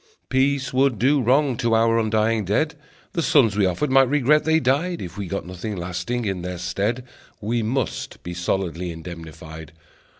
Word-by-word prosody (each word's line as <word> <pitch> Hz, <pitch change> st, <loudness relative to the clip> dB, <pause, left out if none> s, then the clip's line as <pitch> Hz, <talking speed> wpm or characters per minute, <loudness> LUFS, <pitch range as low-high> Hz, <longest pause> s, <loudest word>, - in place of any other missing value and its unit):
Peace 130 Hz, 0 st, +1 dB
would 130 Hz, -2 st, +2 dB
do 135 Hz, +5 st, +3 dB
wrong 130 Hz, +2 st, +3 dB
to 115 Hz, -1 st, +1 dB
our 115 Hz, 0 st, +3 dB
undying 110 Hz, 0 st, +1 dB
dead, 110 Hz, -, 0 dB, 0.4 s
The 170 Hz, -, 0 dB
sons 125 Hz, -10 st, +4 dB
we 100 Hz, -2 st, +3 dB
offered 130 Hz, +11 st, -1 dB
might 135 Hz, -1 st, +5 dB
regret 150 Hz, +1 st, +3 dB
they 160 Hz, 0 st, +4 dB
died 160 Hz, +6 st, 0 dB
If 90 Hz, -1 st, -7 dB
we 100 Hz, -2 st, -5 dB
got 100 Hz, 0 st, -4 dB
nothing 90 Hz, +4 st, -5 dB
lasting 90 Hz, +7 st, -3 dB
in 95 Hz, -3 st, -2 dB
their 90 Hz, 0 st, -5 dB
stead. 100 Hz, +8 st, -2 dB, 0.3 s
We 115 Hz, +2 st, -1 dB
must 120 Hz, +2 st, -3 dB
be 90 Hz, -, -5 dB
solidly 90 Hz, 0 st, -2 dB
indemnified. 80 Hz, -2 st, -9 dB
110 Hz, 170 wpm, -23 LUFS, 90-130 Hz, 0.4 s, might